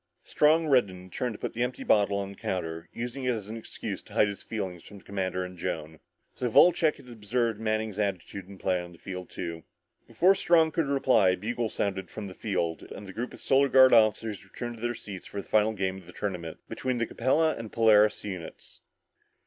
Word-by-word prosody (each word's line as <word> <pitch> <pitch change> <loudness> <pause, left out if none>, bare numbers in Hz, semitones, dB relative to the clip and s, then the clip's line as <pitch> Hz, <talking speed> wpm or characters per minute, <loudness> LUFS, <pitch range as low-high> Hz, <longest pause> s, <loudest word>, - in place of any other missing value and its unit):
Strong 155 +2 +3
reddened 130 -8 +4
and 90 0 -14
turned 125 -2 -2
to - - -9
put - - -4
the 120 - -3
empty 125 +1 -2
bottle 100 -1 +3
on 100 -1 -3
the - - -11
counter, 80 -3 -4
using 125 +3 -5
it 125 -1 +1
as 105 -2 -7
an 110 - -5
excuse 115 - -6
to - - -16
hide 105 - +4
his 100 - -6
feelings 95 -6 -5
from 105 - -12
the 95 - -16
commander 95 -2 -2
and 90 -1 -10
Joan. 80 -3 -4 0.3
So 125 - -2
Wolcheck 160 +4 +5
had - - -16
observed 115 0 -1
Manning's 110 -1 -1
attitude 100 -1 -3
and 100 -1 -12
play 90 -1 0
on 85 0 -10
the - - -15
field 90 0 -7
too. 85 -1 -5 0.5
Before 165 - +4
Strong 165 -4 +4
could 160 -2 0
reply, 130 -8 +4
a 90 - +1
bugle 115 +3 -2
sounded 95 -3 -2
from 110 - -7
the 95 - -7
field 90 -6 -2
and 105 - -9
the 95 - -9
group 120 +4 -4
of - - -12
Solar 140 +1 +3
Guard 130 -1 +7
officers 110 -2 +3
returned 120 +4 -7
to - - -13
their 120 0 -1
seats 95 -5 -9
for 100 - -6
the - - -8
final 110 0 +3
game 95 -2 -2
of 90 - -17
the 90 - -12
tournament 90 -5 -4
between 130 -1 -2
the 120 - +1
Capella 150 +8 +2
and 115 - -6
the - - -16
Polaris 110 -2 +5
units. 90 -5 -8
105 Hz, 225 wpm, -28 LUFS, 95-120 Hz, 0.5 s, Guard